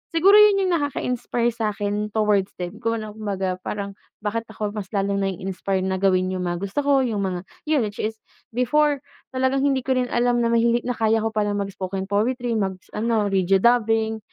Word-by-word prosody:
siguro 390 Hz, +5 st, +6 dB
yun 405 Hz, -2 st, +6 dB
yung 365 Hz, -, +1 dB
nakaka-inspire 250 Hz, -5 st, -1 dB
sa'kin 210 Hz, -2 st, -2 dB
towards 210 Hz, -3 st, +2 dB
them 180 Hz, +4 st, -6 dB
kung 230 Hz, 0 st, -1 dB
ano 210 Hz, -, -7 dB
kumbaga 190 Hz, -4 st, -3 dB
parang 200 Hz, -1 st, -4 dB, 0.3 s
bakit 225 Hz, +2 st, -1 dB
ako 210 Hz, -1 st, -3 dB
mas 200 Hz, -2 st, -4 dB
lalong 200 Hz, -1 st, 0 dB
nai-inspire 190 Hz, 0 st, -2 dB
na 190 Hz, 0 st, -1 dB
gawin 185 Hz, -1 st, +2 dB
yung 185 Hz, -1 st, -2 dB
mga 175 Hz, 0 st, -1 dB
gusto 200 Hz, +8 st, -2 dB
ko, 285 Hz, 0 st, +3 dB
yung 215 Hz, -5 st, -1 dB
mga 185 Hz, -2 st, -2 dB, 0.3 s
yun, 295 Hz, -6 st, +2 dB
which 205 Hz, 0 st, -7 dB
is 220 Hz, +1 st, -2 dB, 0.4 s
before 290 Hz, +3 st, +2 dB, 0.3 s
talagang 260 Hz, +1 st, +1 dB
hindi 265 Hz, -2 st, +1 dB
ko 265 Hz, -, +2 dB
rin 250 Hz, -, 0 dB
alam 240 Hz, 0 st, +2 dB
na 235 Hz, -, +2 dB
mahili 235 Hz, +1 st, +3 dB
na 250 Hz, -, -1 dB
kaya 225 Hz, 0 st, +2 dB
ko 225 Hz, -, 0 dB
palang 205 Hz, -1 st, 0 dB
mag-spoken 195 Hz, -1 st, -4 dB
poetry, 240 Hz, +3 st, 0 dB
mag 190 Hz, -2 st, -2 dB
s -, -, -28 dB
ano, 220 Hz, -1 st, +1 dB
radio 190 Hz, 0 st, +3 dB
dubbing, 225 Hz, -2 st, +2 dB
215 Hz, 195 wpm, -23 LUFS, 195-240 Hz, 0.4 s, siguro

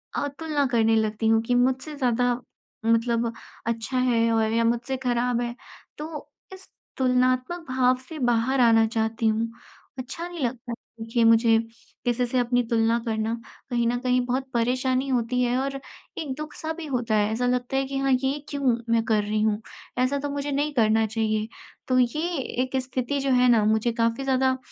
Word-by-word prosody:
अ, -, -, 0 dB
तुलना 290 Hz, 0 st, -1 dB
करने 225 Hz, -2 st, +3 dB
लगती 220 Hz, 0 st, 0 dB
हूँ 225 Hz, 0 st, +4 dB
कि 245 Hz, +2 st, 0 dB
मुझसे 260 Hz, +4 st, +1 dB
ज़्यादा 245 Hz, -2 st, +1 dB, 0.5 s
मतलब 230 Hz, 0 st, +2 dB, 0.4 s
अच्छा 230 Hz, +3 st, -2 dB
है 235 Hz, -2 st, +2 dB
और 220 Hz, -1 st, +2 dB
या 230 Hz, 0 st, +2 dB
मुझसे 240 Hz, +3 st, 0 dB
खराब 245 Hz, -1 st, 0 dB
है। 240 Hz, 0 st, -3 dB, 0.4 s
तो 305 Hz, 0 st, -7 dB, 0.2 s
इस 380 Hz, 0 st, -13 dB, 0.3 s
तुलनात्मक 255 Hz, +6 st, +1 dB
भाव 255 Hz, 0 st, +3 dB
से 320 Hz, -, -7 dB
बाहर 245 Hz, +1 st, +1 dB
आना 225 Hz, -2 st, +5 dB
चाहती 225 Hz, 0 st, -1 dB
हूँ, 225 Hz, +1 st, 0 dB, 0.5 s
अच्छा 270 Hz, +7 st, -5 dB
नहीं 350 Hz, -1 st, -8 dB
लगता 240 Hz, 0 st, -4 dB
है -, -, -3 dB, 0.3 s
देखिए 230 Hz, +1 st, 0 dB
मुझे, 225 Hz, 0 st, +5 dB, 0.5 s
किसी 245 Hz, 0 st, +1 dB
से 245 Hz, +1 st, -2 dB
अपनी 245 Hz, 0 st, +2 dB
तुलना 230 Hz, 0 st, +2 dB
करना, 220 Hz, 0 st, -1 dB, 0.4 s
कहीं 235 Hz, -1 st, +1 dB
न 245 Hz, +1 st, +1 dB
कहीं 250 Hz, 0 st, +2 dB
बहुत 255 Hz, +2 st, -1 dB
परेशानी 255 Hz, +3 st, +1 dB
होती 250 Hz, -1 st, 0 dB
है 245 Hz, +1 st, +1 dB
और 275 Hz, 0 st, -3 dB, 0.4 s
एक 285 Hz, -4 st, -3 dB
दुख-सा 305 Hz, +1 st, -5 dB
भी 330 Hz, 0 st, -7 dB
होता 245 Hz, -6 st, -1 dB
है। 210 Hz, 0 st, +2 dB
ऐसा 235 Hz, +3 st, -1 dB
लगता 250 Hz, +1 st, 0 dB
है 270 Hz, -, +1 dB
कि 270 Hz, 0 st, -4 dB
हाँ, 270 Hz, 0 st, +1 dB
ये 265 Hz, +3 st, +1 dB
क्यों 275 Hz, -4 st, +1 dB, 0.2 s
मैं 230 Hz, -1 st, +3 dB
कर 215 Hz, -2 st, +2 dB
रही 210 Hz, +1 st, -1 dB
हूँ? 215 Hz, 0 st, +1 dB, 0.4 s
ऐसा 280 Hz, +2 st, +1 dB
तो 290 Hz, +1 st, -3 dB
मुझे 285 Hz, 0 st, -3 dB
नहीं 290 Hz, +2 st, 0 dB
करना 220 Hz, -3 st, +3 dB
चाहिए। 215 Hz, 0 st, -1 dB, 0.4 s
तो 255 Hz, -, +2 dB
ये 310 Hz, +8 st, 0 dB, 0.3 s
एक 260 Hz, +1 st, -2 dB
स्थिति 255 Hz, +2 st, -2 dB
जो 275 Hz, 0 st, 0 dB
है 250 Hz, 0 st, +4 dB
ना 230 Hz, -3 st, +5 dB
मुझे 220 Hz, +2 st, +2 dB
काफ़ी 230 Hz, +4 st, +1 dB
ज़्यादा 260 Hz, -1 st, +2 dB
245 Hz, 185 wpm, -25 LUFS, 230-265 Hz, 0.5 s, आना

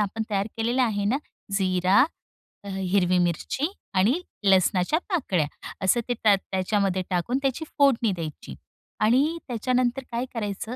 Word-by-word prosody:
आपण 210 Hz, +2 st, -1 dB
तयार 200 Hz, 0 st, 0 dB
केलेलं 240 Hz, +3 st, +1 dB
आहे 205 Hz, -4 st, 0 dB
ना, 225 Hz, +7 st, +2 dB, 0.4 s
जिरा, 185 Hz, 0 st, +3 dB, 0.6 s
अ, 200 Hz, -, -10 dB
हिरवी 185 Hz, -1 st, +1 dB
मिरची 175 Hz, -, 0 dB, 0.3 s
आणि 210 Hz, -, +3 dB, 0.2 s
लसणाच्या 190 Hz, -, +3 dB
पाकळ्या, 200 Hz, -, +1 dB, 0.4 s
असं 215 Hz, +6 st, +4 dB
ते 245 Hz, -, +1 dB
त्या 215 Hz, -3 st, +4 dB
त्याच्यामध्ये 190 Hz, 0 st, -1 dB
टाकून 185 Hz, +8 st, 0 dB
त्याची 275 Hz, +3 st, -1 dB
फोडणी 250 Hz, -6 st, +4 dB
द्यायची. 155 Hz, -, -6 dB, 0.4 s
आणि 270 Hz, +10 st, +3 dB
त्याच्यानंतर 250 Hz, +2 st, 0 dB
काय 235 Hz, +2 st, -1 dB
करायचं, 220 Hz, +1 st, -4 dB
205 Hz, 135 wpm, -25 LUFS, 185-245 Hz, 0.6 s, असं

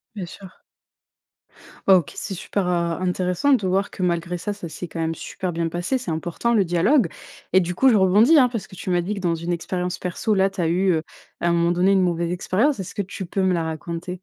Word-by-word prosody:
Bien 190 Hz, -, -4 dB
sûr. 190 Hz, +1 st, -13 dB, 1.3 s
Bah, 190 Hz, -, +8 dB
OK, 170 Hz, -, -2 dB
c'est 195 Hz, -, -5 dB
super 190 Hz, +1 st, -2 dB
heu, 180 Hz, -, +1 dB, 0.3 s
intéressant 180 Hz, +8 st, +1 dB
de 205 Hz, -7 st, +2 dB
voir 195 Hz, +2 st, +1 dB
que 185 Hz, -, -5 dB
malgré 170 Hz, 0 st, -1 dB
ça, 205 Hz, +4 st, -3 dB
ça 180 Hz, -4 st, -8 dB
s'est 165 Hz, +3 st, -7 dB
quand 165 Hz, -, -7 dB
même 165 Hz, 0 st, -1 dB
super 185 Hz, -1 st, -5 dB
bien 165 Hz, 0 st, -1 dB
passé. 175 Hz, +10 st, -1 dB
C'est 245 Hz, -9 st, -5 dB
important, 175 Hz, +9 st, -1 dB
le 210 Hz, -, +4 dB
dialogue. 180 Hz, -, +3 dB, 0.5 s
Et 190 Hz, -, +7 dB
du 180 Hz, -1 st, -1 dB
coup, 265 Hz, +9 st, +4 dB
je 235 Hz, -, +4 dB
rebondis, 210 Hz, -, +5 dB
hein, 250 Hz, -3 st, +6 dB
parce 230 Hz, -4 st, -5 dB
que -, -, -13 dB
tu 185 Hz, -, -6 dB
m'as 175 Hz, 0 st, +2 dB
dit 205 Hz, +4 st, -3 dB
que -, -, -5 dB
dans 175 Hz, -3 st, 0 dB
une 170 Hz, +2 st, -4 dB
expérience 180 Hz, +1 st, -2 dB
perso, 185 Hz, +4 st, -1 dB
là, 195 Hz, 0 st, +3 dB
tu 190 Hz, -2 st, -4 dB
as 165 Hz, -, +1 dB
eu, 185 Hz, +3 st, +2 dB
heu, 160 Hz, -2 st, 0 dB, 0.4 s
à 170 Hz, -, 0 dB
un 170 Hz, -, +3 dB
moment 170 Hz, 0 st, +2 dB
donné, 180 Hz, +2 st, +3 dB
une 190 Hz, -, +4 dB
mauvaise 170 Hz, -1 st, 0 dB
expérience, 210 Hz, +10 st, +1 dB
est-ce 190 Hz, -1 st, -6 dB
que 205 Hz, -, -2 dB
tu 190 Hz, 0 st, -6 dB
peux 190 Hz, +3 st, -2 dB
me 185 Hz, -1 st, +2 dB
la 170 Hz, -2 st, 0 dB
raconter? 170 Hz, +3 st, -5 dB
180 Hz, 250 wpm, -23 LUFS, 170-195 Hz, 1.3 s, Bah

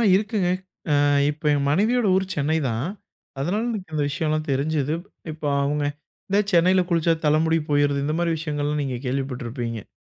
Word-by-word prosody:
இருக்குங்க. 205 Hz, -3 st, 0 dB, 0.4 s
அ -, -, +4 dB, 0.4 s
இப்ப 155 Hz, +1 st, -13 dB
என் 140 Hz, -1 st, +1 dB
மனைவியோட 215 Hz, +8 st, +2 dB
ஊர் 190 Hz, 0 st, +2 dB
சென்னை 155 Hz, +2 st, +1 dB
தான். 115 Hz, +5 st, -2 dB, 0.5 s
அதனால 190 Hz, +10 st, 0 dB
எனக்கு 185 Hz, -7 st, -6 dB
இந்த 145 Hz, -, +1 dB
விஷயம்லாம் 155 Hz, +1 st, -1 dB
தெரிஞ்சுது. 150 Hz, +2 st, 0 dB, 0.4 s
இப்போ 155 Hz, -1 st, -5 dB, 0.2 s
அவுங்க 145 Hz, +1 st, 0 dB, 0.4 s
இந்த 200 Hz, +1 st, +3 dB
சென்னையில 180 Hz, +2 st, +5 dB
குளிச்சா 165 Hz, -1 st, +3 dB
தலைமுடி 160 Hz, +2 st, +3 dB
போயிருது. 145 Hz, -1 st, +2 dB
இந்தமாரி 165 Hz, +3 st, 0 dB
விஷயங்கள்லாம் 150 Hz, -1 st, -1 dB
நீங்க 130 Hz, -2 st, -3 dB
கேள்விப்பட்டிருப்பீங்க? 125 Hz, -4 st, -3 dB
155 Hz, 145 wpm, -23 LUFS, 140-170 Hz, 0.5 s, சென்னையில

